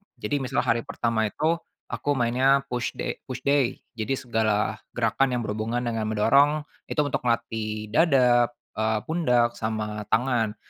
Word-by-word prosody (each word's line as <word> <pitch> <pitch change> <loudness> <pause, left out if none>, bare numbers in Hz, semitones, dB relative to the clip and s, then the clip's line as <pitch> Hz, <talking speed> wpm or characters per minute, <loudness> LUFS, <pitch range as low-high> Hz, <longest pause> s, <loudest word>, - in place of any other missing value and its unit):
Jadi, 145 -1 -2
misalnya 130 - -1
hari 115 0 +1
pertama 115 -5 0
itu 160 +9 0 0.3
aku 145 - -1
mainnya 130 +4 +3
push 120 -1 -2
da - - -2
push 130 -1 -5
day, 140 -3 +2 0.2
jadi 110 +4 -3
segala 110 -3 0 0.2
gerakan 135 -1 +1
yang 125 - 0
berhubungan 110 +3 -2
dengan 115 -2 -1
mendorong 140 +8 +3 0.2
itu 150 - -3
untuk 145 - -1
melatih 110 -2 -2
dada, 125 -6 +4 0.3
eee 110 0 +1
pundak, 125 -8 +1
sama 105 -1 -3
tangan. 115 -3 +1
120 Hz, 145 wpm, -25 LUFS, 110-135 Hz, 0.3 s, dada